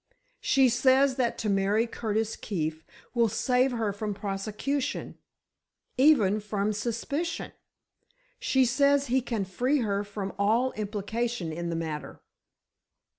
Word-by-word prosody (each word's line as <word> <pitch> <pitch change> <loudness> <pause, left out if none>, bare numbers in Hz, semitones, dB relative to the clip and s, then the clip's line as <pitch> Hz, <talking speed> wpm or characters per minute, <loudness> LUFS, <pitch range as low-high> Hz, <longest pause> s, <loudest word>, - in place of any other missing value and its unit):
She 270 -2 +4
says 260 +3 +4
that 245 -3 0
to 220 - -3
marry 200 +3 +2
Curtis 225 -1 -2
Keefe 160 -5 -3 0.3
will 235 -2 +3
save 250 +5 +2
her 220 -4 -1
from 205 0 -4
prosecution—even 215 +2 -1
from 210 0 -1
suspicion. 245 +10 -3 0.9
She 265 -1 +3
says 280 +3 +3
he 260 +1 +1
can 225 -5 -2
free 250 +9 0
her 200 -2 0
from 200 -1 -5
all 230 +6 +2
implication 215 -2 -3
in 170 +1 -4
the 165 - -2
matter." 160 -2 -5
220 Hz, 120 wpm, -28 LUFS, 200-255 Hz, 0.9 s, She